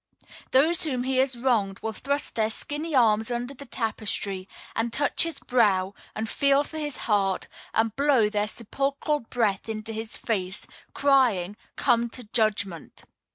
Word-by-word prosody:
Those 320 +7 +4
whom 265 -7 0
he 260 0 0
has 260 -1 +2
wronged 225 -6 +1
will 220 - -2
thrust 280 +5 -2
their 220 -1 +1
skinny 295 +7 -3
arms 220 -3 +4
under 245 +2 -3
the 280 +1 -11
tapestry, 210 -5 -2 0.3
and 230 +1 0
touch 285 +3 +2
his 330 -3 +2
brow, 200 -6 +2 0.2
and 220 +1 -2
feel 280 +3 +3
for 315 +1 -7
his 295 -2 -3
heart, 195 -3 +1 0.2
and 225 -1 +1
blow 275 -6 +4
their 210 0 0
sepulchral 275 +7 -2
breath 225 -4 -1
into 220 0 -3
his 220 +1 -4
face, 195 -4 -2 0.3
crying: 240 -10 +3 0.2
"Come 235 -2 +2
to 250 +2 -7
judgment!" 210 -6 -1
230 Hz, 155 wpm, -26 LUFS, 210-275 Hz, 0.3 s, Those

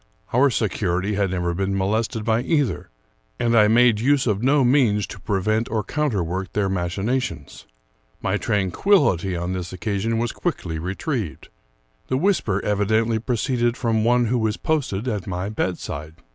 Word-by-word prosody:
Our 135 +4 +5
security 100 -4 -1
had 100 -1 +1
never 90 -1 -1
been 95 +2 -1
molested 110 +3 -1
by 115 0 +2
either, 145 - 0 0.5
and 120 -1 +2
I 105 -2 +6
made 115 0 +4
use 135 +3 +2
of 105 -4 0
no 135 +2 +3
means 120 -6 +3
to 100 - -10
pre 95 +2 -1
vent 110 +2 0
or 110 -1 -1
counterwork 95 - -2
their 100 -2 0
machinations. 95 +8 -3 0.5
My - - -1
tranquillity 95 - +2
on 85 +2 -3
this 90 -1 -4
occasion 100 +5 -2
was 120 0 -1
quickly 85 - -3
retrieved. 95 - -4 0.6
The 130 - 0
whisper 145 - +1
evi 105 0 +1
dently 110 +1 +1
proceeded 120 0 0
from 115 -3 +1
one 120 +1 +3
who 120 +2 +1
was 110 -1 0
posted 130 - -1
at 105 -6 -3
my 90 +1 -3
bedside. 80 -6 -4
110 Hz, 160 wpm, -22 LUFS, 95-120 Hz, 0.6 s, I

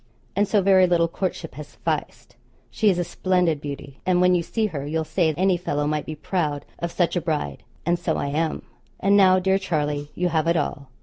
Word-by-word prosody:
And 205 +1 +2
so 205 -1 +2
very 190 -1 +5
little 170 -1 +3
courtship 175 -1 -4
has 150 +2 -8
sufficed. - - -4 0.4
She 215 - +2
is 185 - +2
a 175 - +1
splendid 175 -3 0
beauty, 140 -1 -7
and 180 -1 +2
when 180 0 +5
you 175 - +3
see 220 +6 -1
her 150 -9 -3
you'll 160 +3 -1
say 160 0 +1
any 185 0 +3
fellow 145 -4 -2
might 150 0 -1
be 155 - -4
proud 150 -3 -2
of 170 0 -3
such 175 0 0
a 175 - +1
bride; 150 - -2 0.2
and 175 +1 +1
so 160 - -1
I - - -2
am. 155 +2 -1 0.4
And 200 +1 +3
now, 190 -2 +6
dear 190 +1 +2
Charlie, 150 -5 -2
you 180 0 0
have 160 -1 0
it 170 0 +3
all. 140 -2 -3
170 Hz, 220 wpm, -24 LUFS, 150-185 Hz, 0.4 s, now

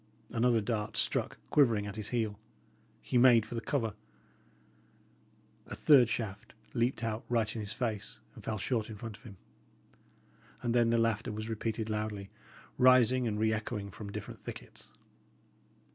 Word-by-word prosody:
Another 115 -1 +3
dart 105 0 -2
struck - - 0
quivering 115 -8 +4
at 100 0 -6
his 110 -1 -4
heel. 110 -4 -1 0.6
He 125 - +2
made 120 -3 +6
for - - -9
the 115 - -2
cover. 115 -5 -1 1.7
A - - -6
third 130 -6 +6
shaft 110 -3 -4 0.2
leaped 120 0 0
out 110 0 -2
right 115 -3 +1
in 110 - -3
his 105 +1 -4
face, 110 -4 -3 0.2
and - - -13
fell 110 - -2
short 115 0 -1
in 110 - -7
front 105 0 -7
of - - -21
him. 105 -7 -12 1.3
And 120 - 0
then 120 -1 +4
the 115 - +3
laughter 115 0 +1
was 110 +1 -5
repeated 110 0 -2
loudly, 105 -2 -3 0.5
rising 125 -1 +5
and 105 -2 -1
reechoing 110 -2 -1
from 100 +1 -8
different - - -8
thickets. - - -10
110 Hz, 155 wpm, -32 LUFS, 105-120 Hz, 1.7 s, made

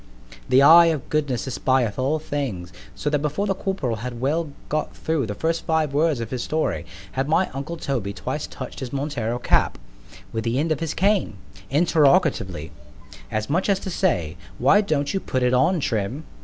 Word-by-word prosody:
——The 130 +2 +6
eye 170 +3 +9
of 155 -6 -1
Goodness 145 -5 0
espieth 130 -4 0
all 140 +5 +1
things——so 105 - -5
that 150 - +2
before 150 +7 -1
the 195 - +1
corporal 190 - -2
had 120 +2 -6
well 150 +5 0 0.2
got 155 +1 -2
through 155 -7 -1
the 105 - -4
first 165 +7 -1
five 160 -3 +1
words 150 -2 +2
of 115 -1 -5
his 125 -2 -2
story, 155 +4 -1 0.2
had 135 +2 -2
my 180 +4 +2
uncle 140 +6 -5
Toby 120 -10 -2
twice - - -4
touch'd - - -8
his 125 -2 -5
Montero 135 -5 -2
cap - - +2 0.6
with 110 0 -2
the 115 +2 0
end 155 +3 0
of 155 - 0
his 165 -2 -3
cane, 195 - +1 0.3
interrogatively——as 125 - 0
much 175 +8 0
as 200 - +4
to 190 - -5
say, 90 - 0 0.2
Why 170 - +5
don't 150 -7 -1
you 195 - +1
put 130 -8 -2
it 125 0 +2
on, 165 +8 +3
_Trim? 120 +3 -2
140 Hz, 180 wpm, -23 LUFS, 120-160 Hz, 0.6 s, eye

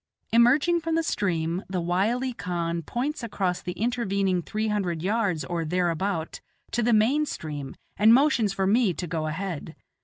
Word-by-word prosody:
Emerging 275 +9 +4
from 325 0 -2
the 330 - +1
stream, 175 - -1
the 185 -1 -1
wily 210 +9 0
khan 170 -4 -2
points 260 - -3
across 190 -6 -2
the 180 - -4
intervening 200 -6 0
three 215 +5 -3
hundred 180 -6 -1
yards 200 -5 0
or 170 -1 -2
thereabout 175 +1 -1 0.3
to 240 - 0
the 240 +1 +2
main 235 +8 +3
stream, 145 - -5 0.2
and 215 +2 +6
motions 245 -5 +4
for 195 0 -1
me 205 -2 +3
to 180 - -4
go 160 -2 -2
ahead. 160 -1 -4
195 Hz, 160 wpm, -26 LUFS, 170-235 Hz, 0.3 s, and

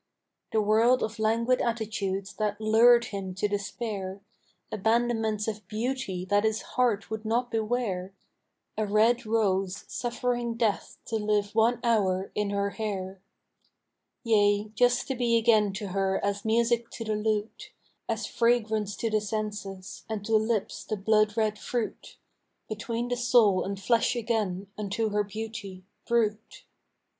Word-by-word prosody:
The 220 -1 +2
world 225 +4 +4
of 220 0 -4
languid 230 +3 +2
attitudes 210 -4 -2
that 210 -1 -1
lured 235 +2 +5
him 190 -2 -4
to 200 +2 0
despair; 200 -1 -4 0.5
Abandonments 220 0 +1
of 215 -3 -5
beauty 220 -4 -3
that 205 +2 +2
his 220 0 0
heart 230 -5 +1
would 220 0 -4
not 235 +2 0
beware 215 -5 -1 0.7
A 215 -1 0
red 220 +3 +3
rose 200 -3 0
suffering 240 -1 -2
death 225 -3 -1
to 225 - -1
live 210 -1 0
one 230 +2 +3
hour 195 -5 +1
in 210 -1 -1
her 200 0 -1
hair. 195 -4 -4 1.0
Yea, 205 -2 +3
just 245 +2 +2
to 270 - -1
be 240 -2 +2
again 220 -3 +4
to 200 0 -5
her 190 0 0
as 200 0 -1
music 235 +1 +2
to 230 - -5
the 215 -1 -1
lute, 210 0 -2 0.4
As 225 -1 -1
fragrance 220 -4 +1
to 225 +3 -2
the 215 0 +2
senses, 205 -3 -5
and 210 -2 -4
to 225 0 +2
lips 220 -1 0
the 215 - -3
blood 215 +1 +2
red 215 -1 +1
fruit, 240 -3 -4 0.5
Between 230 +2 -3
the 245 - 0
soul 235 -5 +4
and 195 0 -4
flesh 230 +4 +2
again, 215 -5 -1
unto 210 +2 -1
her 210 0 +1
beauty, 205 -3 -7 0.2
brute. 220 -2 0
215 Hz, 145 wpm, -28 LUFS, 205-230 Hz, 1.0 s, lured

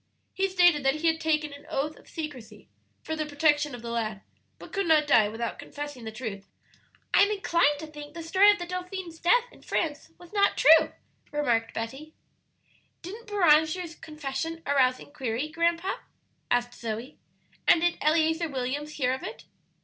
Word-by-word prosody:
He 390 0 0
stated 350 -5 +4
that 270 +1 +3
he 310 +2 -4
had 320 0 +2
taken 305 -2 0
an 285 - -13
oath 300 +3 -2
of - - -19
secrecy, 295 -8 -8 0.4
for 315 - -3
the 310 -1 -3
protection 295 -1 +2
of 240 - -11
the 235 - -5
lad, 215 -3 -2 0.4
but - - -13
could 395 -2 0
not 310 -2 +5
die 215 -7 +5
without 230 +2 -4
confessing 290 -5 -7
the 220 - -5
truth." 215 -4 -6 0.7
"I'm 405 +1 +6
inclined 340 -7 +2
to 315 - -7
think 295 0 -11
the 335 - -6
story 380 +5 +5
of 410 - +5
the 350 - -5
dauphin's 360 -1 -6
death 475 +8 +4
in - - -18
France 305 -3 -2
was 350 +2 -16
not 400 -1 +3
true," 320 0 +6 0.4
remarked 240 -6 0
Betty. 270 +8 -6 0.9
"Didn't 430 +7 -9
Beranger's 335 -3 +3
confession 310 +2 -5
arouse 260 -2 +3
inquiry, 265 -1 -4
grandpa?" 335 +3 0 0.5
asked 245 0 +1
Zoe. 230 +5 -5 0.5
"And 340 - +6
did 350 0 +1
Eleazer 320 +2 +2
Williams 275 +3 -3
hear 255 -3 0
of 265 - -4
it?" - - -7
305 Hz, 170 wpm, -27 LUFS, 265-335 Hz, 0.9 s, I'm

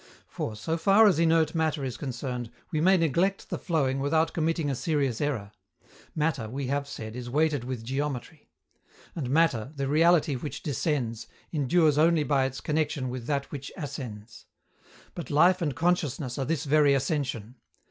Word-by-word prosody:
For, 110 - -5
so 160 +10 -2
far 195 +6 +5
as 185 -7 +4
inert 160 -2 +3
matter 160 -3 0
is 125 - -4
concerned, 125 -3 -4 0.2
we 155 -3 0
may 190 +3 +5
neglect 175 +5 0
the - - -2
flowing 140 -7 0
without 160 +4 +1
committing 165 -1 0
a 140 - 0
serious 135 -4 -1
error: 125 -9 -2 0.6
matter, 150 -8 -1
we 135 +3 -4
have 140 +2 -1
said, 110 -5 -7
is 125 -1 -6
weighted 150 -1 +1
with 125 -2 -5
geometry; 140 +3 -4 0.7
and 140 -7 -3
matter, 135 -5 +2
the 140 -1 -2
reality 160 +1 +4
which 140 +4 -6
descends, 125 -5 -2 0.3
endures 150 0 +3
only 165 -1 +4
by 140 -2 +2
its 135 0 -4
connection 150 -4 -1
with 125 -1 -6
that 140 -2 -2
which 140 -1 -6
ascends. 120 - -7 0.7
But 170 -6 -7
life 180 +5 +4
and 145 -6 -1
consciousness 150 -5 0
are 135 - -1
this 155 0 -1
very 145 -1 +4
ascension. 130 - -2
145 Hz, 165 wpm, -27 LUFS, 130-160 Hz, 0.7 s, far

